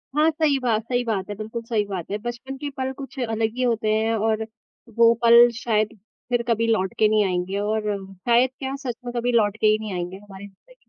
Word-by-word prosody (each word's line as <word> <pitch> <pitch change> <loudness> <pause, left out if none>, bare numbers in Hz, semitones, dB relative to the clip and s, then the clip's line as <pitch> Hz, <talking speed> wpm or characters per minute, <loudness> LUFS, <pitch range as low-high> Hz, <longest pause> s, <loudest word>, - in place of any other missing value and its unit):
हाँ, 305 +2 +4
सही 300 -3 +1
बात 230 -3 +1
सही 245 +1 -1
बात 210 -5 -2
है, 205 - -4
बिल्कुल 220 +2 -6
सही 225 -3 0
बात 190 -3 -6
है। 205 - -1
बचपन 240 +4 -6
के 290 +1 -5
पल 260 0 -2
कुछ 270 -1 -8
अलग 225 +1 -1
ही 255 - 0
होते 225 -3 +1
हैं 220 +1 +1
और 220 0 0 0.5
वो 230 0 +6
पल 235 +1 +8
शायद 215 -1 -1 0.3
फिर 240 -1 +1
कभी 230 0 +1
लौट 190 -5 +1
के 215 - +5
नहीं 215 -1 +3
आएँगे 185 +1 -2
और 215 +1 -1 0.3
शायद 240 +6 +3
क्या 270 0 -3
सच 240 -2 -2
में 240 - -5
कभी 245 +1 0
लौट 220 -2 +2
के 215 - +4
ही 215 0 +4
नहीं 215 -3 -5
आएँगे 180 +1 -4
हमारी 200 0 -11
ज़िंदगी 200 - -22
में। - - -30
225 Hz, 230 wpm, -23 LUFS, 210-240 Hz, 0.5 s, पल